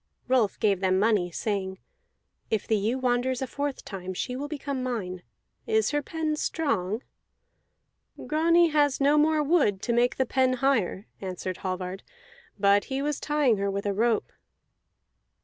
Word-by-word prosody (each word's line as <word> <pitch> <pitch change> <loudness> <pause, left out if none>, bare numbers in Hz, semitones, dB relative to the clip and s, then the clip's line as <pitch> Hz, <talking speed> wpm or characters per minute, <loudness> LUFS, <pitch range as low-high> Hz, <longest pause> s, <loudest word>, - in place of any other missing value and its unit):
Rolf 250 -6 +2
gave 200 -3 +2
them 185 -1 +2
money, 205 -3 +2
saying: 190 +1 -3 0.7
"If 220 -2 0
the 220 - +2
ewe 215 +5 0
wanders 250 0 0
a 265 - -1
fourth 285 +2 -4
time, 185 -2 -6
she 250 - -3
will 285 +3 -4
become 280 -3 -4
mine. 200 -8 -3 0.5
Is 440 -1 +2
her 295 0 +1
pen 310 +1 -2
strong?" 225 - -1 1.2
"Grani 335 +2 +4
has 290 -3 +2
no 285 +1 +4
more 305 0 +3
wood 280 - +2
to 235 - 0
make 245 +3 +2
the 260 - +1
pen 260 0 +2
higher," 245 -7 0 0.2
answered 185 -1 -4
Hallvard, 185 0 -4 0.6
"but 200 0 +4
he 270 +1 -3
was 295 -1 -1
tying 295 -7 +2
her 200 0 -1
with 200 +1 -3
a 200 - 0
rope." 225 +1 +1
245 Hz, 155 wpm, -27 LUFS, 200-285 Hz, 1.2 s, Grani